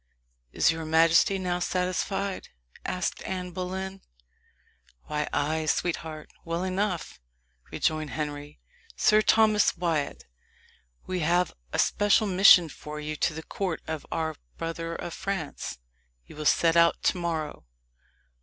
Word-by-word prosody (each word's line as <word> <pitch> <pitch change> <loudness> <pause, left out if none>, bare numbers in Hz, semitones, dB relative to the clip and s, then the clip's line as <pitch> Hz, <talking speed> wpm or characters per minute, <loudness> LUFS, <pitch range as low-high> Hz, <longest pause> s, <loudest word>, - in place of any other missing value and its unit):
"Is - - +3
your 165 0 -4
majesty 165 +4 +4
now 180 -1 -1
satisfied?" 185 +2 -2 0.4
asked 180 -1 -2
Anne 180 -1 -4
Boleyn. 190 +1 -5 1.0
"Why, 150 -1 -3
ay, 155 +2 0
sweetheart, 160 -1 -2
well 170 +1 -2
enough," 185 -1 -2 0.5
rejoined 155 -1 0
Henry. 145 -1 -5 0.4
"Sir 215 0 +4
Thomas 215 -3 +4
Wyat, 155 - -1 0.8
we 185 -1 -2
have 175 +2 +2 0.2
a - - -2
special 205 +1 +3
mission 185 -3 +7
for 150 0 -8
you 150 0 -4
to 155 - 0
the 160 - -6
court 185 -2 -3
of 160 -2 -5
our 160 -1 -2 0.2
brother 165 0 -4
of 170 - -6
France. 190 - -4 0.5
You - - -14
will 155 0 -6
set 165 +2 +4
out 170 0 +4
to - - +2
morrow." 160 - -3
170 Hz, 125 wpm, -27 LUFS, 155-185 Hz, 1.0 s, mission